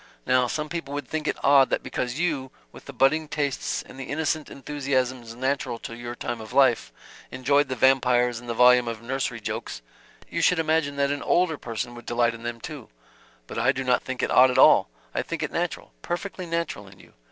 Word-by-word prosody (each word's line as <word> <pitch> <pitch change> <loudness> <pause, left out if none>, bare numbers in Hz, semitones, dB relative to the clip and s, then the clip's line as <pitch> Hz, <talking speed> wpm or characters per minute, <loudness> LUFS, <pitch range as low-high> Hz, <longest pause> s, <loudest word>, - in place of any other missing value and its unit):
Now 125 0 +3
some 150 +5 -3
people 150 -3 -5
would 145 - -4
think 155 -1 -3
it - - -1
odd 135 -1 +6
that - - -1
because 125 +1 -3
you, 150 -6 -1 0.2
with - - -14
the - - -8
budding 155 +4 +2
tastes 145 -2 -2
and 130 - -13
the 135 - -5
innocent 155 +2 -2
enthusiasms 130 -4 -2
natural 130 -1 -1
to 115 - -8
your 120 0 -7
time 120 -1 -4
of 110 +2 -10
life, 130 -4 +3 0.4
enjoyed 140 +3 +2
the 130 - -3
Vampires 125 -2 +3
and 120 0 -11
the 115 - -2
volume 125 0 +6
of 115 -1 -5
nursery 125 -1 -2
jokes, - - -5 0.4
you - - -3
should 180 - +4
imagine 155 -3 +1
that 140 0 +1
an 145 - -2
older 175 -2 +2
person 120 +1 -4
would 120 0 -12
delight 120 0 +2
in 115 - -10
them 120 0 -5
too 150 -1 -8 0.6
but - - -5
I 125 - +4
do 135 0 -3
not 125 -1 +2
think 130 -1 -5
it - - 0
odd 130 +1 +7
at 125 - -1
all. - - +6 0.2
I - - 0
think - - -4
it - - -3
natural - - -3
perfectly 185 0 -4
natural 165 -12 -3
in 95 0 -16
you. - - -18
130 Hz, 215 wpm, -25 LUFS, 120-145 Hz, 0.6 s, odd